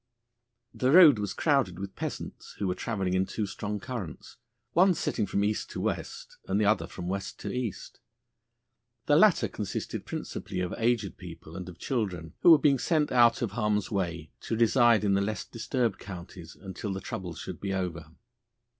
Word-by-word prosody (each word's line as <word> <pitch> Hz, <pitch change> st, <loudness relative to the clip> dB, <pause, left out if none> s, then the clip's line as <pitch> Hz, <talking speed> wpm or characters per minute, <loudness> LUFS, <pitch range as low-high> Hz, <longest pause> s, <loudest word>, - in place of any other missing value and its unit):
The 130 Hz, -, 0 dB
road 150 Hz, -, +8 dB
was 105 Hz, -1 st, -3 dB
crowded 135 Hz, -, +1 dB
with 95 Hz, +1 st, -6 dB
peasants -, -, -6 dB
who 100 Hz, -, -2 dB
were 90 Hz, -, +1 dB
travelling 95 Hz, -3 st, -2 dB
in 95 Hz, +1 st, +1 dB
two 110 Hz, -, -2 dB
strong 105 Hz, +1 st, -4 dB
currents, 100 Hz, -, -7 dB, 0.4 s
the -, -, +1 dB
one 185 Hz, 0 st, +6 dB
setting 110 Hz, -8 st, -1 dB
from 100 Hz, -, 0 dB
east 105 Hz, +1 st, -1 dB
to -, -, -6 dB
west, -, -, -4 dB
and 95 Hz, +2 st, +1 dB
the 105 Hz, -, +2 dB
other 110 Hz, +2 st, +2 dB
from 90 Hz, -, -7 dB
west 100 Hz, +1 st, -4 dB
to -, -, -4 dB
east. 125 Hz, -6 st, -5 dB, 1.1 s
The 145 Hz, -, +4 dB
latter 170 Hz, -, +5 dB
consisted 100 Hz, +1 st, -5 dB
principally 95 Hz, -2 st, -5 dB
of 90 Hz, -1 st, -2 dB
aged 115 Hz, -4 st, 0 dB
people 85 Hz, -2 st, -10 dB
and 90 Hz, -1 st, -6 dB
of 90 Hz, -, -11 dB
children, 90 Hz, -, -3 dB
who -, -, +7 dB
were 165 Hz, -, +10 dB
being 140 Hz, -2 st, +3 dB
sent 155 Hz, 0 st, +1 dB
out 120 Hz, -1 st, +5 dB
of 110 Hz, -, -2 dB
harm's 105 Hz, -1 st, 0 dB
way 85 Hz, -6 st, -2 dB
to 115 Hz, -, -2 dB
reside 115 Hz, -1 st, +4 dB
in 100 Hz, -1 st, +2 dB
the 100 Hz, -, +3 dB
less 105 Hz, +2 st, -2 dB
disturbed 115 Hz, -3 st, -2 dB
counties 90 Hz, -2 st, -9 dB
until 95 Hz, +1 st, -6 dB
the 95 Hz, -, -4 dB
troubles 90 Hz, -3 st, -6 dB
should -, -, -7 dB
be 100 Hz, -, -2 dB
over. 90 Hz, -5 st, -3 dB
105 Hz, 185 wpm, -28 LUFS, 95-120 Hz, 1.1 s, were